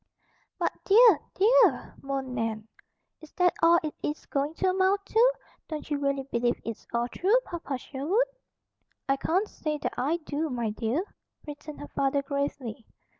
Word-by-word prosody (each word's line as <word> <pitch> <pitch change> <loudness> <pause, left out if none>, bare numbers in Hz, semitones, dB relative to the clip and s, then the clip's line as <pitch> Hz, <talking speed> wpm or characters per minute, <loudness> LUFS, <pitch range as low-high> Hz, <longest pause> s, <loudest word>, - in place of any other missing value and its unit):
"But, - - 0
dear, 425 -4 +7 0.2
DEAR!" 420 - +4
moaned 270 -2 -3
Nan. 225 -2 -3 0.5
"Is 315 - -13
that 360 -1 +3
all 335 +1 +6
it 310 - -3
is 295 - -3
going 285 +3 -2
to 380 - 0
amount 380 +2 +2
to? 475 +4 +4 0.3
Don't 310 -1 -6
you 290 - 0
really 275 -1 0
believe 240 -2 0
it's 230 -2 -6
all 235 0 0
true, 390 - +2
Papa 325 -6 -4
Sherwood?" 300 - 0 0.8
"I 275 - +3
can't 370 +9 0
say 305 -6 -3
that - - -3
I 285 +7 +1
do, 305 +2 -2
my 235 -4 -2
dear," 230 - -1 0.4
returned 295 0 -9
her 290 - -7
father 275 0 0
gravely. 275 -5 -4
290 Hz, 160 wpm, -28 LUFS, 265-355 Hz, 0.8 s, dear